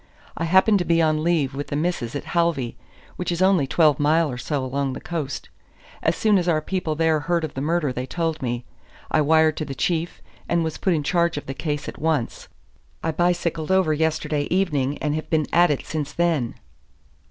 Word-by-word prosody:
"I 165 Hz, -, -2 dB
happened 190 Hz, +4 st, +4 dB
to -, -, +1 dB
be 170 Hz, -1 st, +2 dB
on 155 Hz, -1 st, +2 dB
leave 160 Hz, -6 st, +1 dB
with 145 Hz, +1 st, -4 dB
the -, -, -3 dB
Missus 150 Hz, -6 st, -2 dB
at 145 Hz, -, -3 dB
Halvey, 170 Hz, -8 st, +1 dB, 0.4 s
which 180 Hz, -, -2 dB
is 170 Hz, -, -2 dB
only 185 Hz, -6 st, +3 dB
twelve 155 Hz, 0 st, +3 dB
mile 155 Hz, +1 st, +3 dB
or 125 Hz, -, -5 dB
so 140 Hz, 0 st, -2 dB
along 135 Hz, +1 st, -2 dB
the -, -, -6 dB
coast. 155 Hz, -5 st, -5 dB, 0.5 s
As 160 Hz, -, +1 dB
soon 210 Hz, -3 st, +3 dB
as 175 Hz, -, -2 dB
our 160 Hz, -3 st, +3 dB
people 160 Hz, -1 st, -2 dB
there 160 Hz, 0 st, +2 dB
heard 170 Hz, +3 st, 0 dB
of 155 Hz, -, -4 dB
the 135 Hz, -, -4 dB
murder 155 Hz, -2 st, 0 dB
they 125 Hz, +1 st, -4 dB
told 165 Hz, +1 st, -2 dB
me. 120 Hz, -1 st, -3 dB, 0.5 s
I 155 Hz, -, +3 dB
wired 160 Hz, +1 st, +4 dB
to 155 Hz, -, -2 dB
the 135 Hz, -1 st, -6 dB
Chief, 170 Hz, +4 st, -1 dB, 0.3 s
and 170 Hz, -1 st, +2 dB
was 160 Hz, -1 st, -4 dB
put 185 Hz, -4 st, +2 dB
in 150 Hz, -, -1 dB
charge 170 Hz, 0 st, +1 dB
of 145 Hz, -, -5 dB
the 135 Hz, -, -4 dB
case 150 Hz, 0 st, -3 dB
at -, -, -8 dB
once. 155 Hz, -7 st, -1 dB, 0.6 s
I 160 Hz, -, 0 dB
bicycled 170 Hz, -1 st, 0 dB
over 190 Hz, -4 st, +3 dB
yesterday 155 Hz, -1 st, 0 dB
evening, 150 Hz, -7 st, 0 dB
and 150 Hz, -1 st, -1 dB
have 155 Hz, 0 st, -4 dB
been 155 Hz, -2 st, +2 dB
at 175 Hz, +1 st, +5 dB
it 145 Hz, -, -1 dB
since 150 Hz, -2 st, -4 dB
then." 165 Hz, -9 st, 0 dB
160 Hz, 210 wpm, -23 LUFS, 145-170 Hz, 0.6 s, at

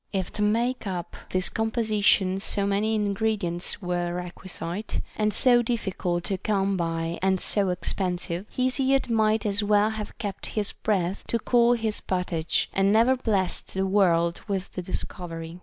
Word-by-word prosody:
If 190 Hz, -3 st, -2 dB
to -, -, -4 dB
make 230 Hz, +3 st, +1 dB
up 180 Hz, -2 st, -4 dB
this 185 Hz, 0 st, +1 dB
composi 220 Hz, -1 st, -1 dB
tion 190 Hz, -1 st, +4 dB
so 200 Hz, 0 st, +1 dB
many 205 Hz, +2 st, +1 dB
ingredients 205 Hz, -3 st, -1 dB
were 175 Hz, -1 st, -1 dB
requisite, 180 Hz, +2 st, -5 dB, 0.2 s
and 215 Hz, 0 st, +1 dB
so 245 Hz, +2 st, +4 dB
difficult 190 Hz, -7 st, -2 dB
to 190 Hz, 0 st, -2 dB
come 195 Hz, -1 st, 0 dB
by 165 Hz, -1 st, -2 dB
and 190 Hz, 0 st, +2 dB
so 200 Hz, 0 st, +1 dB
expensive, 180 Hz, 0 st, -2 dB
Hesiod 260 Hz, 0 st, +1 dB
might 220 Hz, -1 st, +2 dB
as 205 Hz, 0 st, +1 dB
well 210 Hz, +1 st, +3 dB
have 215 Hz, -1 st, -6 dB
kept 205 Hz, -3 st, -5 dB
his 205 Hz, -1 st, 0 dB
breath 190 Hz, -3 st, -1 dB
to 235 Hz, -, +1 dB
cool 235 Hz, +1 st, +3 dB
his 225 Hz, -3 st, 0 dB
pottage, 180 Hz, -3 st, 0 dB
and 195 Hz, +1 st, +3 dB
never 230 Hz, +5 st, +5 dB
blessed 205 Hz, -9 st, 0 dB
the 190 Hz, 0 st, +1 dB
world 170 Hz, -4 st, +2 dB
with 195 Hz, -2 st, -3 dB
the 180 Hz, -, -4 dB
discovery. 170 Hz, -2 st, -6 dB
200 Hz, 155 wpm, -26 LUFS, 180-220 Hz, 0.2 s, never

